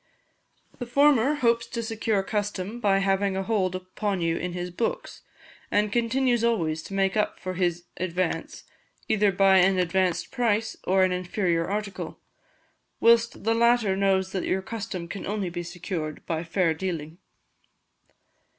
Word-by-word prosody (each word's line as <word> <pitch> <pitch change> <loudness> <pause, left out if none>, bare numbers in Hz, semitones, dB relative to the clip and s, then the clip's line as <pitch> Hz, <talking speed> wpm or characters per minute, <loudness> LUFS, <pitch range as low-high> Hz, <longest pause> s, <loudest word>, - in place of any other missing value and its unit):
The 245 - -5
former 280 +1 +4
hopes 235 -4 +1
to 235 - -4
secure 220 -3 -1
custom 205 +1 -3
by 200 -4 +3
having 195 0 +1
a 195 - -1
hold 190 -4 0
upon 185 +2 -3
you 165 -1 0
in 180 +1 -3
his 180 0 -4
books, - - -3 0.5
and 210 0 +1
continues 240 +1 +1
always 165 -9 +1
to 195 - -8
make 195 0 +1
up 210 - 0
for 185 - -4
his 175 -1 -1
advance, 180 -1 -2 0.4
either 210 -2 +3
by 195 0 +5
an 190 +1 +4
advanced 180 0 0
price, 225 -4 0
or 190 +1 +3
an 185 - +2
inferior 180 -2 -1
article, 205 0 -4 0.8
whilst 235 0 +3
the 225 +2 +2
latter 235 -3 +3
knows 190 -1 +1
that 190 -2 -2
your 190 0 0
custom 195 -6 -5
can 195 - -6
only 200 -3 -2
be 175 0 -4
secured 170 -3 -5
by 165 0 -2
fair 170 0 +1
dealing. 165 -1 -5
195 Hz, 150 wpm, -26 LUFS, 180-220 Hz, 0.8 s, by